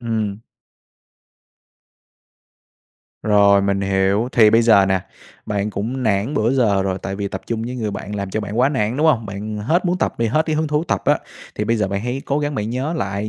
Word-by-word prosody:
Ừm. 110 -4 -2 2.8
Rồi, 100 -2 +4
mình 100 0 0
hiểu. 95 +4 +1
Thì 110 -3 +6
bây 115 +1 +4
giờ 100 -4 +5
nè, 95 -1 +1 0.5
bạn 105 0 -1
cũng 115 +7 -3
nản 110 +5 0
bữa 115 +4 +1
giờ 105 -7 +2
rồi, 95 -1 -2
tại 95 0 -4
vì 100 -1 -3
tập 95 - -6
chung 115 -1 -2
với 125 +2 -5
người 110 -3 -2
bạn 100 +1 -6
làm 100 -1 -4
cho 110 - -2
bạn 105 +2 -5
quá 130 +2 +4
nản, 120 -3 -1
đúng 155 +2 +2
hông? 120 -8 +2
Bạn 105 +2 -5
hết 160 - 0
muốn 180 +1 0
tập - - -1
đi, 115 - +1
hết 155 +8 +1
cái 155 -1 0
hứng 155 0 0
thú 150 +2 0
tập - - -1
á, - - +3 0.4
thì 105 - -2
bây 115 +1 +1
giờ, 105 -3 0
bạn 100 +1 -2
hãy 125 +4 -3
cố 140 - 0
gắng 145 -1 -2
bạn 105 -2 -2
nhớ 135 +6 -2
lại 100 -2 -3
110 Hz, 220 wpm, -20 LUFS, 100-125 Hz, 2.8 s, Thì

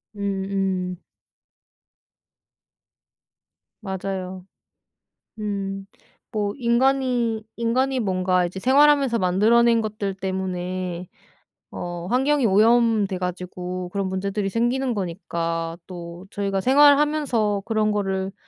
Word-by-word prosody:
음음. 195 -2 -2 2.8
맞아요. 190 -2 -5 0.9
음 195 -2 -3 0.5
뭐 205 -1 0
인간이 245 -2 +1
인간이 255 +3 +1
뭔가 185 -3 +1
이제 190 +2 -7
생활하면서 275 -1 +4
만들어낸 225 +6 +4
것들 210 -3 -3
때문에 185 -2 -3 0.6
어 175 -1 -5
환경이 270 +1 +2
오염돼 215 -1 +3
가지고 180 0 -5
그런 195 -1 -1
문제들이 195 +1 -2
생기는 245 +4 0
거니까 170 -3 -3
또 175 0 -9
저희가 195 -1 -1
생활하면서 280 -5 +4
그런 215 -2 +1
거를 195 -1 -2
200 Hz, 215 characters per minute, -23 LUFS, 185-235 Hz, 2.8 s, 생활하면서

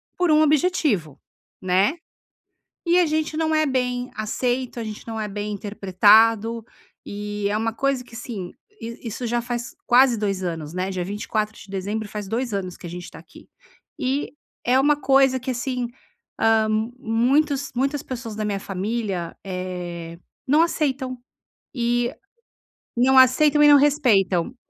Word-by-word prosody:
Por 355 -3 +2
um 305 - +5
objetivo, 295 - +1 0.4
né. 190 - +2 0.9
E 345 +1 +4
a 350 - +3
gente 310 0 -1
não 315 0 0
é 310 0 +3
bem 250 -2 -1
aceito, 245 +4 -2
a 230 - -3
gente 215 -1 -8
não 225 -1 -4
é 215 - -2
bem 205 +1 -4
interpretado, 215 +3 +3 0.4
eh, 205 0 -3
é 205 - 0
uma 225 +1 -1
coisa 275 0 0
que, 240 - -16
assim, 220 -6 -6 0.3
i 230 +1 -7
isso 235 +3 -5
já 240 +1 0
faz 240 0 -5
quase 250 0 +5
2 195 -3 -1
anos, 160 -3 -4
né, 185 +2 -2
dia 185 -2 -3
24 210 +2 -3
de - - -13
dezembro 205 +3 -3
faz 210 -1 -6
2 235 +2 -2
anos 185 -2 -4
que - - -10
a - - -7
gente 175 +1 -8
tá - - -12
aqui. - - -16 0.5
E 265 +2 -1 0.3
é 250 +2 +3
uma 290 +2 +3
coisa 270 -1 +4
que 255 - -4
assim, 250 0 -2 0.5
hã, 225 -1 +3 0.3
muitos 275 +4 +1
muitas 275 +3 -1
pessoas 230 -4 -6
da 215 - -2
minha 200 -2 -2
família, 195 -2 -3
eh, 180 -3 -6 0.3
não 295 +4 +4
aceitam, 265 -6 -1 0.6
eh, 240 +3 0 0.8
não 260 +2 +4
aceitam 295 +4 +5
e - - +8
não 290 -1 +8
respeitam. 245 - +2
230 Hz, 160 wpm, -23 LUFS, 205-265 Hz, 0.9 s, e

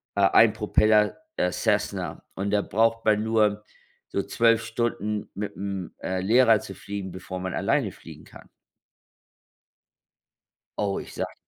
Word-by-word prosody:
äh 100 - +1
ein 110 -2 +6
Propeller, 105 0 +3 0.2
äh 90 - +1
Cessna - - -1
und 100 +1 -2
da 105 0 +3
braucht 115 +2 +1
man 105 -1 +3
nur 105 -2 +1 0.5
so 100 - -1
12 115 0 +2
Stunden 115 -2 -2
mit 105 +1 -5
dem, 95 -1 -5
äh, 95 0 -2
Lehrer 115 +2 +5
zu 95 - -8
fliegen, 100 -2 -6
bevor 95 0 -7
man 95 0 -4
alleine - - 0
fliegen - - -13
kann. - - -15 2.3
Oh, 100 -2 0
ich - - -10
sage - - -4
105 Hz, 140 wpm, -25 LUFS, 100-110 Hz, 2.3 s, ein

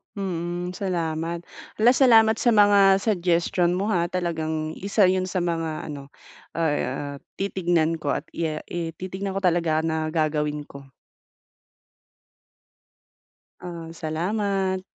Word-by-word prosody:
Mm, 175 -2 -3
salamat. 170 -2 -3 0.3
Hala, 230 +3 +5
salamat 225 -4 +5
sa - - -1
mga 200 -2 +5
suggestion 175 -3 +1
mo 200 +4 -1
ha. 175 -3 +1
Talagang 160 -3 -2
isa 200 +2 +2
yun 185 0 0
sa 185 -1 -1
mga 165 -2 -3
ano, 140 -1 -8 0.5
ah, 145 -3 -1 0.2
titignan 170 -4 0
ko 145 -2 -1
at - - -3
ya 155 -2 -3
i 165 -2 -4
titignan 190 +2 -5
ko 195 - -3
talaga 165 -3 +2
na 160 -1 -1
gagawin 150 -2 -1
ko. 140 -1 -13 2.7
Ah, 170 -2 -7
salamat. 190 +4 -1
175 Hz, 115 wpm, -24 LUFS, 160-190 Hz, 2.7 s, Hala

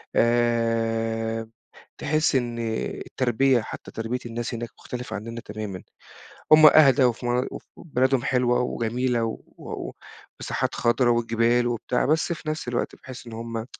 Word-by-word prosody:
آآ، 115 -1 +1 0.5
تحس 155 -2 +2
إن 120 -2 -1 0.5
التربية 130 0 +2
حتى - - -8
تربية 115 +3 -3
الناس 120 +1 -4
هناك 120 0 -4
مختلفة 125 -3 -6
عنّنا 115 +3 -6
تمامًا، 105 -4 -6 0.7
هُم 155 0 +9
أهدى 145 -3 +6
وفي 120 0 +1
م 125 +1 +1
وف - - -8
بلادهم 130 -4 +1
حلوة 125 -1 +2
وجميلة 120 0 -1
و 115 - -5 0.2
و - - -6 0.5
ومساحات - - -2
خضرة 120 +1 +2
والجبال 120 +1 +2
وبتاع، 120 +1 -1
بس 160 +4 +1
في 160 -2 -6
نَفس 155 -4 -4
الوقت 120 - -2
باحس 130 -2 -11
إن 115 - -8
هُم 115 +1 -6
120 Hz, 140 wpm, -25 LUFS, 115-125 Hz, 0.7 s, هُم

